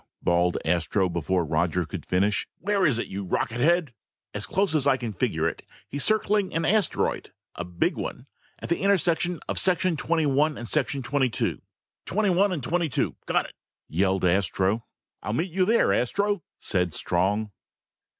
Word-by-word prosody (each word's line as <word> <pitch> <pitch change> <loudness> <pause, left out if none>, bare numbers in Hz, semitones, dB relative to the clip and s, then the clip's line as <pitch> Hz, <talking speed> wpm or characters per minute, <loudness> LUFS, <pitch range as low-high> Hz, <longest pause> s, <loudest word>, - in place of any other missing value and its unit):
bawled 85 0 +2
Astro 90 +3 +1
before 85 +1 0
Roger 85 +3 0
could 75 - -7
finish. 100 +3 +1
"Where 195 0 +1
is 130 -6 +2
it, 120 - -2
you 100 +1 -5
rockethead?" 130 - +1 0.4
"As 105 +1 0
close 195 -3 +1
as 145 -3 +1
I 135 -1 +4
can 120 -4 -5
figure 90 - 0
it, - - -5 0.2
he's 145 - -2
circling 210 -2 +2
an 165 0 +1
asteroid, 210 +2 +1 0.2
a 90 - -5
big 90 -1 -1
one, - - -5 0.3
at - - -8
the 170 - +1
intersection 180 -3 +2
of - - 0
sections 180 -3 +2
twenty 165 -1 +1
one 145 +2 +2
and 120 - -6 0.4
twenty 130 0 +1
two!" - - -2 0.5
"Twenty 205 +1 +1
one 195 +3 +3
and 160 -8 -3
twenty 170 +2 0
two! 120 - -1
Got - - +1
it!" - - -12 0.3
yelled 95 +2 +1
Astro. 95 +4 +1 0.3
"I'll 105 - -3
meet 165 +8 -1
you 185 +2 +2
there, 230 +4 +3
Astro!" 200 - 0 0.2
said 90 -4 0
Strong. 100 +4 0
130 Hz, 170 wpm, -26 LUFS, -, 0.5 s, I